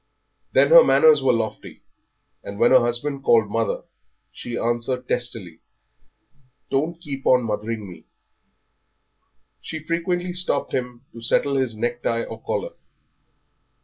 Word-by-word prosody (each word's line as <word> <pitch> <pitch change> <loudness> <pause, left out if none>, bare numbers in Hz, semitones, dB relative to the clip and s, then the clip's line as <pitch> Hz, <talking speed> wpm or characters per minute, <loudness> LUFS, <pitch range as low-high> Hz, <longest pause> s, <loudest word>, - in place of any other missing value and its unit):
Then - - +4
her - - +9
manners 470 -1 +5
were - - +3
lofty, 115 -3 -4 0.6
and 100 - -8
when 120 +3 +3
her 130 - +8
husband 125 +4 -2
called 110 -5 +3
"Mother," 115 0 -1 0.5
she 120 -1 -6
answered 120 +2 -2
testily, 110 -9 -4 1.1
"Don't 160 +5 -1
keep 140 -5 -6
on 125 -1 +4
mothering 110 -1 -4
me." 85 -4 -13 1.6
She 160 - -6
frequently 175 +3 -2
stopped 180 0 -1
him 125 0 -4
to 115 - -10
settle 140 +4 +1
his 130 -5 -1
necktie 120 0 -2
or 115 0 -9
collar. - - -3
120 Hz, 125 wpm, -22 LUFS, 115-145 Hz, 1.6 s, her